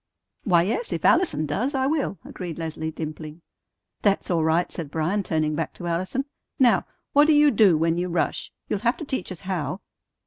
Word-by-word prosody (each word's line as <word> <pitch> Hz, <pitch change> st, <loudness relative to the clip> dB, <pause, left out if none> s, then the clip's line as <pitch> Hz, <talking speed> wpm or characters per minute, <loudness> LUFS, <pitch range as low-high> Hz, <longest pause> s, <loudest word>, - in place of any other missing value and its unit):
"Why, 175 Hz, -5 st, +4 dB
yes, 450 Hz, -, -2 dB
if -, -, -2 dB
Allison 155 Hz, -, +3 dB
does, 230 Hz, -, -1 dB
I 265 Hz, 0 st, +1 dB
will," 280 Hz, -8 st, 0 dB
agreed 175 Hz, -3 st, -6 dB
Leslie, 160 Hz, -1 st, -4 dB
dimpling. 155 Hz, +1 st, -7 dB, 0.6 s
"That's 200 Hz, -2 st, +1 dB
all 165 Hz, -2 st, +2 dB
right," 160 Hz, +2 st, +1 dB
said 165 Hz, -5 st, -5 dB
Bryan, 165 Hz, +7 st, 0 dB
turning 155 Hz, -4 st, 0 dB
back 165 Hz, +1 st, -3 dB
to 175 Hz, -, -8 dB
Allison. 185 Hz, +11 st, -1 dB, 0.3 s
"Now, 235 Hz, -8 st, +4 dB, 0.3 s
what 290 Hz, +1 st, +6 dB
do 315 Hz, -, +5 dB
you 295 Hz, 0 st, +6 dB
do 200 Hz, -7 st, +5 dB
when 165 Hz, +2 st, +1 dB
you 180 Hz, +1 st, -1 dB
rush? 170 Hz, -1 st, -1 dB, 0.2 s
You'll 205 Hz, -, -1 dB
have 235 Hz, +3 st, +1 dB
to 315 Hz, -, -6 dB
teach 260 Hz, -9 st, -4 dB
us 180 Hz, -, -7 dB
how." 185 Hz, -2 st, -3 dB
180 Hz, 195 wpm, -24 LUFS, 160-235 Hz, 0.6 s, what